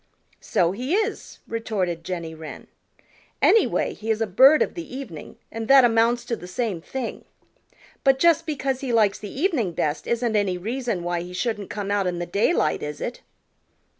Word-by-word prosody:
"So 170 Hz, -1 st, +1 dB
he 255 Hz, -, -1 dB
is," 435 Hz, +1 st, -2 dB
retorted 190 Hz, -7 st, -2 dB
Jenny 170 Hz, -2 st, -5 dB
Wren. 160 Hz, -1 st, -9 dB, 0.7 s
"Anyway, 450 Hz, -, +3 dB
he 220 Hz, -, -8 dB
is 220 Hz, -1 st, +1 dB
a 225 Hz, -, +1 dB
bird 265 Hz, +10 st, +6 dB
of -, -, -5 dB
the 335 Hz, -7 st, -7 dB
evening, 200 Hz, -, -8 dB, 0.2 s
and 225 Hz, 0 st, -5 dB
that 270 Hz, -1 st, +8 dB
amounts 235 Hz, +1 st, +2 dB
to 235 Hz, -, -2 dB
the 180 Hz, -, -10 dB
same 190 Hz, -2 st, -2 dB
thing. 255 Hz, +6 st, -5 dB, 0.8 s
But 270 Hz, -1 st, +4 dB
just 330 Hz, +2 st, +3 dB
because 275 Hz, -4 st, -1 dB
he 265 Hz, -3 st, -2 dB
likes 215 Hz, -4 st, +3 dB
the 205 Hz, -, -7 dB
evening 270 Hz, -, 0 dB
best 150 Hz, -2 st, -2 dB
isn't 235 Hz, -1 st, 0 dB
any 200 Hz, -3 st, +1 dB
reason 225 Hz, -1 st, -3 dB
why 175 Hz, 0 st, -1 dB
he 180 Hz, +1 st, -8 dB
shouldn't 205 Hz, +1 st, -2 dB
come 205 Hz, -1 st, -4 dB
out 200 Hz, -2 st, +1 dB
in 175 Hz, -1 st, -2 dB
the 175 Hz, -, -3 dB
daylight, 200 Hz, -, +1 dB
is 150 Hz, 0 st, -5 dB
it?" 240 Hz, -, -5 dB
225 Hz, 180 wpm, -24 LUFS, 180-260 Hz, 0.8 s, that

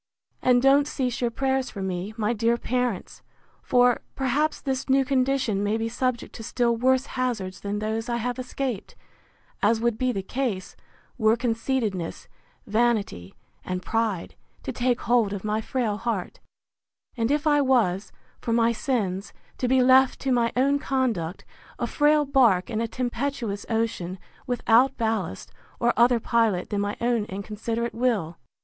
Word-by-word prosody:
And 250 Hz, -1 st, +4 dB
don't 280 Hz, +1 st, +5 dB
cease 255 Hz, -2 st, -2 dB
your 240 Hz, -, +2 dB
prayers 265 Hz, +2 st, 0 dB
for 195 Hz, -, -6 dB
me, 190 Hz, +3 st, -4 dB
my 215 Hz, +1 st, +1 dB
dear 230 Hz, +1 st, +1 dB
parents; 245 Hz, -5 st, -2 dB, 0.4 s
for, 245 Hz, -1 st, +3 dB
perhaps, 280 Hz, +4 st, 0 dB
this 265 Hz, -1 st, -3 dB
new 270 Hz, 0 st, +4 dB
condition 260 Hz, -6 st, +1 dB
may 210 Hz, +2 st, +1 dB
be 225 Hz, 0 st, -1 dB
subject 245 Hz, +1 st, -2 dB
to 225 Hz, -, -8 dB
still 235 Hz, +1 st, +1 dB
worse 260 Hz, +3 st, +2 dB
hazards 240 Hz, -9 st, -3 dB
than 205 Hz, 0 st, -3 dB
those 220 Hz, +2 st, -2 dB
I 235 Hz, -, 0 dB
have 245 Hz, +2 st, -3 dB
escaped; 255 Hz, -3 st, -4 dB, 0.7 s
as 220 Hz, +2 st, +3 dB
would 235 Hz, -1 st, 0 dB
be 255 Hz, 0 st, +1 dB
the 195 Hz, -5 st, -3 dB
case, 230 Hz, -5 st, -3 dB, 0.4 s
were 220 Hz, 0 st, +4 dB
conceitedness, 225 Hz, -6 st, -2 dB, 0.4 s
vanity, 215 Hz, -, 0 dB, 0.3 s
and 185 Hz, 0 st, -4 dB
pride, 220 Hz, -5 st, -1 dB, 0.3 s
to -, -, -3 dB
take 245 Hz, -1 st, 0 dB
hold 230 Hz, -4 st, +2 dB
of 200 Hz, -, -5 dB
my 215 Hz, +1 st, -1 dB
frail 220 Hz, -3 st, -1 dB
heart; 215 Hz, -5 st, -3 dB, 0.8 s
and 230 Hz, -2 st, 0 dB
if 295 Hz, +2 st, +1 dB
I 295 Hz, -1 st, +4 dB
was, 220 Hz, -8 st, +1 dB, 0.3 s
for 230 Hz, -, -2 dB
my 230 Hz, 0 st, +3 dB
sins, 215 Hz, -5 st, -2 dB, 0.3 s
to 250 Hz, -, 0 dB
be 260 Hz, 0 st, +4 dB
left 260 Hz, +1 st, +5 dB
to 270 Hz, -, 0 dB
my 235 Hz, -2 st, +2 dB
own 280 Hz, +3 st, +3 dB
conduct, 230 Hz, -12 st, -1 dB, 0.3 s
a -, -, -1 dB
frail 295 Hz, 0 st, +3 dB
bark 245 Hz, -9 st, +3 dB
in 220 Hz, 0 st, -1 dB
a 230 Hz, -, 0 dB
tempestuous 240 Hz, -3 st, -3 dB
ocean, 225 Hz, -6 st, -1 dB, 0.3 s
without 250 Hz, +1 st, +3 dB
ballast, 220 Hz, -, -2 dB, 0.3 s
or 240 Hz, 0 st, +2 dB
other 240 Hz, 0 st, +4 dB
pilot 225 Hz, -6 st, +1 dB
than 205 Hz, -1 st, 0 dB
my 205 Hz, +1 st, -2 dB
own 235 Hz, -3 st, +1 dB
inconsiderate 215 Hz, +4 st, -4 dB
will. 220 Hz, -9 st, 0 dB
235 Hz, 155 wpm, -25 LUFS, 210-255 Hz, 0.8 s, don't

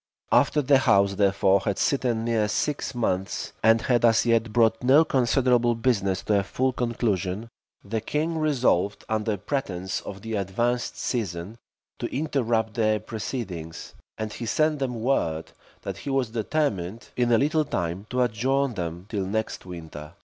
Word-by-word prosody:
After 150 Hz, -, +3 dB
the 135 Hz, 0 st, +5 dB
house, 100 Hz, -5 st, +3 dB
therefore, 100 Hz, 0 st, +3 dB
had 100 Hz, 0 st, -2 dB
sitten 120 Hz, -5 st, 0 dB
near 115 Hz, -3 st, +1 dB
six 140 Hz, +5 st, -2 dB
months, 95 Hz, -5 st, -2 dB
and 115 Hz, 0 st, +4 dB
had 120 Hz, -2 st, +2 dB
as 115 Hz, -1 st, +4 dB
yet 115 Hz, -1 st, +2 dB
brought 115 Hz, -1 st, +3 dB
no 140 Hz, +6 st, +6 dB
considerable 125 Hz, -3 st, +2 dB
business 105 Hz, -6 st, 0 dB
to 105 Hz, -2 st, +2 dB
a -, -, -1 dB
full 130 Hz, +6 st, -1 dB
conclusion, 110 Hz, -4 st, -1 dB, 0.4 s
the 110 Hz, +2 st, -2 dB
king 160 Hz, +7 st, -1 dB
resolved, 125 Hz, -, +1 dB
under 110 Hz, -1 st, 0 dB
pretence 95 Hz, -5 st, -3 dB
of 95 Hz, 0 st, -9 dB
the 115 Hz, 0 st, -5 dB
advanced 120 Hz, +6 st, -1 dB
season, 100 Hz, -2 st, -3 dB, 0.4 s
to -, -, -2 dB
interrupt 120 Hz, -7 st, 0 dB
their 110 Hz, -2 st, +2 dB
proceedings; 105 Hz, -7 st, -6 dB, 0.2 s
and 110 Hz, -1 st, -4 dB
he 120 Hz, -, -5 dB
sent 155 Hz, +4 st, +1 dB
them 125 Hz, -4 st, -2 dB
word, 80 Hz, -11 st, 0 dB, 0.3 s
that -, -, -5 dB
he -, -, -6 dB
was 135 Hz, -4 st, +1 dB
determined, 110 Hz, -, -2 dB
in 120 Hz, -1 st, +1 dB
a 115 Hz, -, +6 dB
little 155 Hz, +5 st, +2 dB
time, 90 Hz, -, -3 dB
to 125 Hz, 0 st, +1 dB
adjourn 130 Hz, +3 st, 0 dB
them 85 Hz, -2 st, -5 dB
till 100 Hz, -4 st, -2 dB
next 110 Hz, -1 st, -3 dB
winter. 80 Hz, -4 st, -9 dB
115 Hz, 155 wpm, -25 LUFS, 100-125 Hz, 0.4 s, no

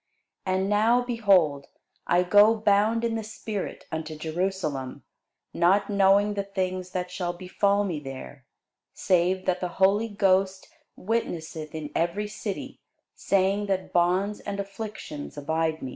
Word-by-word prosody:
And 185 Hz, +1 st, +1 dB
now, 220 Hz, +4 st, +3 dB
behold, 195 Hz, -, +2 dB, 0.4 s
I 175 Hz, +1 st, +3 dB
go 205 Hz, +4 st, +6 dB
bound 215 Hz, +2 st, +2 dB
in 230 Hz, -, 0 dB
the 225 Hz, -1 st, -2 dB
spirit 215 Hz, -2 st, -6 dB
unto 160 Hz, -1 st, -4 dB
Jerusalem, 155 Hz, -4 st, -3 dB, 0.5 s
not 195 Hz, +4 st, +3 dB
knowing 200 Hz, +1 st, +4 dB
the 200 Hz, -, -1 dB
things 185 Hz, -2 st, -3 dB
that 180 Hz, -1 st, -4 dB
shall 175 Hz, -1 st, -3 dB
befall 200 Hz, +3 st, +1 dB
me 175 Hz, -7 st, -2 dB
there: 135 Hz, -1 st, -9 dB, 0.5 s
save 185 Hz, +1 st, +1 dB
that 180 Hz, -1 st, +1 dB
the 180 Hz, -, -2 dB
Holy 200 Hz, +4 st, +3 dB
Ghost 190 Hz, -1 st, +1 dB, 0.3 s
witnesseth 165 Hz, -8 st, -3 dB
in 150 Hz, -2 st, -5 dB
every 175 Hz, +5 st, -1 dB
city, 210 Hz, -1 st, -6 dB, 0.3 s
saying 195 Hz, +1 st, +1 dB
that 190 Hz, -1 st, -2 dB
bonds 185 Hz, +4 st, +2 dB
and 200 Hz, -1 st, -5 dB
afflictions 200 Hz, -8 st, -7 dB
abide 160 Hz, +2 st, -1 dB
me. 130 Hz, -, -4 dB
190 Hz, 135 wpm, -26 LUFS, 175-205 Hz, 0.5 s, go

